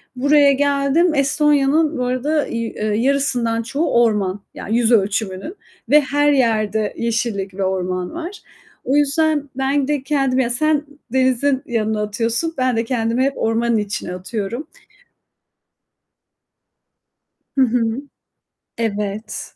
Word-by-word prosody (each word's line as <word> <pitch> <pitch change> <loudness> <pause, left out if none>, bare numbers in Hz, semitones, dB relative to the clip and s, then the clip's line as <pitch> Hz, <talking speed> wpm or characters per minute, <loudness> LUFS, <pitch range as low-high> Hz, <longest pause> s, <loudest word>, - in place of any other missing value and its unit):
Buraya 285 +2 +4
geldim. 285 +4 +2
Estonya'nın, 295 +2 +2
bu 250 - -1
arada 285 +5 0
y 230 - -3
eee, 215 - -5
yarısından 235 0 +1
çoğu 285 +7 -1
orman; 205 -3 0
yani 225 +3 -2
yüz 240 0 +2
ölçümünün 200 - 0 0.3
ve 300 +1 +6
her 290 +2 +2
yerde 220 -5 +1
yeşillik 225 -4 -2
ve 195 0 -3
orman 185 - -2
var. 345 +5 -7 0.4
O 270 - +1
yüzden 295 0 +1
ben 270 +1 +1
de 290 -3 -1
kendim 270 -2 +1
ya 245 -2 +1
sen 300 +4 +1 0.3
denizin 260 +1 +2
yanına 220 -3 -1
atıyorsun, 230 +10 -1
ben 255 -2 +1
de 225 - +1
kendimi 235 +1 0
hep 275 - +1
ormanın 230 +1 +1
içine 205 -3 -3
atıyorum. 215 - -5 2.9
Hı - - +4
hı. 245 +1 0 1.0
Evet. 210 -1 -4
250 Hz, 125 wpm, -19 LUFS, 220-285 Hz, 2.9 s, ve